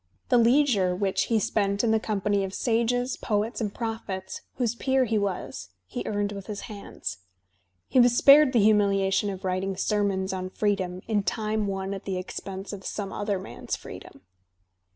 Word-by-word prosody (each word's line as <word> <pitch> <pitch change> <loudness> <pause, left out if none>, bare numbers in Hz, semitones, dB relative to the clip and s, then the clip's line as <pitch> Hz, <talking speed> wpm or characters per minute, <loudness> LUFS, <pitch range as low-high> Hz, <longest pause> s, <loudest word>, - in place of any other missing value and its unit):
The 245 -2 +5
leisure 230 -7 +3
which 190 0 0
he 225 -2 +2
spent 200 0 0
in 230 - +3
the 220 - +3
company 205 -2 0
of 195 0 -4
sages, 245 +2 0
poets, 215 +2 -1
and 210 -2 -1
prophets, 220 -5 -5
whose 240 -3 0
peer 265 +2 +1
he 220 -2 +1
was, 185 - -4 0.2
he 125 +7 -5
eamed 205 -1 -1
with 200 -2 -7
his 210 -2 -5
hands. 205 - -7 0.7
He 260 - +3
was 240 0 +5
spared 285 0 +7
the 235 -5 +3
humiliation 200 -1 +3
of 190 -1 -6
writing 185 +1 -1
sermons 195 -2 0
on 185 0 -4
freedom 190 -3 -1
in 215 -2 +1
time 215 +2 -1
won 195 0 -3
at 195 - -7
the 190 -2 -2
expense 190 +2 -6
of 195 -1 -8
some 200 0 -4
other 205 -1 -1
man's 185 - -5
freedom. - - -11
205 Hz, 175 wpm, -26 LUFS, 190-225 Hz, 0.7 s, spared